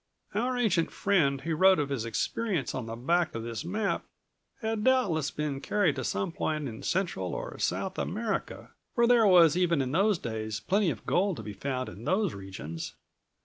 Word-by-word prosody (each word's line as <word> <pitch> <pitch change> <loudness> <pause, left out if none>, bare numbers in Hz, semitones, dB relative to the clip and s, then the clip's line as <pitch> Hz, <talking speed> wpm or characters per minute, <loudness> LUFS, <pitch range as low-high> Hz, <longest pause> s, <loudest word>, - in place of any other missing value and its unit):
"Our 245 +5 0
ancient 185 -9 +2
friend 145 -9 +1
who 165 +3 -2
wrote 190 +3 +6
of 145 -2 -1
his 130 -5 -2
experiences 175 - -1
on 125 -3 -4
the 115 - -5
back 165 +7 +1
of 115 - -3
this 115 +3 -4
map 200 +4 -1 0.6
had 220 -1 -1
doubtless 200 - +2
been 145 -3 -3
carried 180 -6 +1
to - - -2
some 100 +10 -1
point 155 -5 -2
in 110 -3 -7
Central 170 - -1
or - - -6
South 190 - -1
America, 215 +2 -3 0.2
for 235 -2 +4
there 235 -2 +5
was, 170 -4 +7
even 175 -3 +2
in 130 -1 -1
those 195 +5 +3
days, 110 -4 -4
plenty 195 - +1
of 120 -9 -5
gold 190 -2 +1
to 110 - -6
be 105 0 -6
found 130 +3 -3
in 110 - -9
those 190 -3 +1
regions." 95 -5 -7
165 Hz, 190 wpm, -29 LUFS, 125-200 Hz, 0.6 s, was